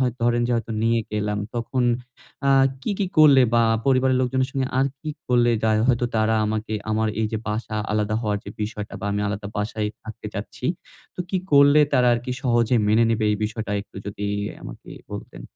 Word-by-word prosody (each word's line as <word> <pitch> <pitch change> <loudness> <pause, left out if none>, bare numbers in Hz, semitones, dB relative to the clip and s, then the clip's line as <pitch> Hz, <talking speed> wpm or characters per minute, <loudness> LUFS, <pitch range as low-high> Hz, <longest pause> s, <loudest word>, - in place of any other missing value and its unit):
হয়তো 125 -1 0
ধরেন 120 0 +2
যে - - +1
হয়তো 115 0 -4
নিয়ে 115 0 +2
গেলাম। 105 0 -1 0.2
তখন 120 +2 -1 0.7
আ - - +5 0.3
কি, - - -2
কি 195 - +1
করলে 145 -4 +8
বা 115 - +5 0.2
পরিবারের 130 -1 +3
লোকজনের 130 +1 0
সঙ্গে 135 -1 -1
আর 135 - +3
কি 155 - -4 0.2
করলে 120 -1 +4
তা 110 - +2 0.2
হয়তো 120 0 +2
তারা 110 +1 +2
আমাকে 110 0 -3 0.2
আমার 110 0 +1
এই 110 - +1
যে 110 - -1
বাসা 110 0 -3 0.2
আলাদা 105 0 0
হওয়ার 105 -1 0
যে 100 - -7
বিষয়টা, 105 -1 -5
বা 100 - -3
আমি 105 - -1
আলাদা 100 0 -4
বাসায় 105 0 -2
থাকতে 110 -1 -9
চাচ্ছি। - - -5 0.5
তো - - -5
কি 190 - +1 0.2
করলে 140 +1 +7
তারা 125 -1 +4
আরকি 125 +2 -3
সহজে 120 -1 +2
মেনে 110 +2 +4
নিবে? 110 -1 +1
এই - - 0
বিষয়টা 110 -1 -4
একটু 100 - -14
যদি 100 0 -5 0.4
আমাকে - - -10 0.2
বলতেন। - - -8
115 Hz, 195 wpm, -23 LUFS, 110-130 Hz, 0.7 s, করলে